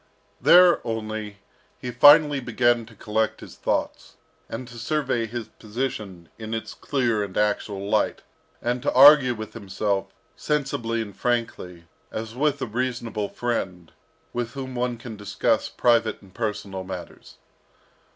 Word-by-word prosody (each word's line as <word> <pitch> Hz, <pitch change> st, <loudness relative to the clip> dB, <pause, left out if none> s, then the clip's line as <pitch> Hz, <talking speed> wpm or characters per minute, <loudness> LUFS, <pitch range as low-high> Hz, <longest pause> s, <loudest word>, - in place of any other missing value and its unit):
There 180 Hz, 0 st, +7 dB
only, 110 Hz, -2 st, -4 dB, 0.4 s
he 125 Hz, -, -5 dB
finally 145 Hz, +3 st, +7 dB
began 120 Hz, -1 st, +1 dB
to 115 Hz, -, -16 dB
collect 110 Hz, +1 st, -1 dB
his -, -, -11 dB
thoughts, -, -, -3 dB, 0.3 s
and 120 Hz, +2 st, -6 dB
to 120 Hz, -1 st, -10 dB
survey 125 Hz, -3 st, -1 dB
his 120 Hz, 0 st, -6 dB
position 105 Hz, -6 st, -5 dB
in 110 Hz, 0 st, -4 dB
its 110 Hz, -, -5 dB
clear 120 Hz, -7 st, 0 dB
and 95 Hz, -2 st, -6 dB
actual 105 Hz, -1 st, -1 dB
light, -, -, 0 dB, 0.4 s
and 120 Hz, +1 st, -1 dB
to -, -, 0 dB
argue 135 Hz, -1 st, +8 dB
with 110 Hz, -1 st, -8 dB
himself, 100 Hz, -2 st, -2 dB, 0.3 s
sensibly 120 Hz, -6 st, -1 dB
and 100 Hz, -3 st, -11 dB
frankly, 115 Hz, -8 st, -2 dB, 0.3 s
as 110 Hz, 0 st, -5 dB
with 145 Hz, +3 st, 0 dB
a -, -, 0 dB
reasonable 120 Hz, -3 st, -3 dB
friend, 95 Hz, -8 st, -3 dB, 0.4 s
with 120 Hz, -1 st, -3 dB
whom 130 Hz, -2 st, -6 dB
one 125 Hz, -1 st, -2 dB
can 115 Hz, -2 st, -9 dB
discuss 105 Hz, -1 st, 0 dB
private 115 Hz, -2 st, +2 dB
and 95 Hz, -2 st, -18 dB
personal 100 Hz, -4 st, -4 dB
matters. 95 Hz, -1 st, -9 dB
115 Hz, 140 wpm, -24 LUFS, 105-125 Hz, 0.4 s, argue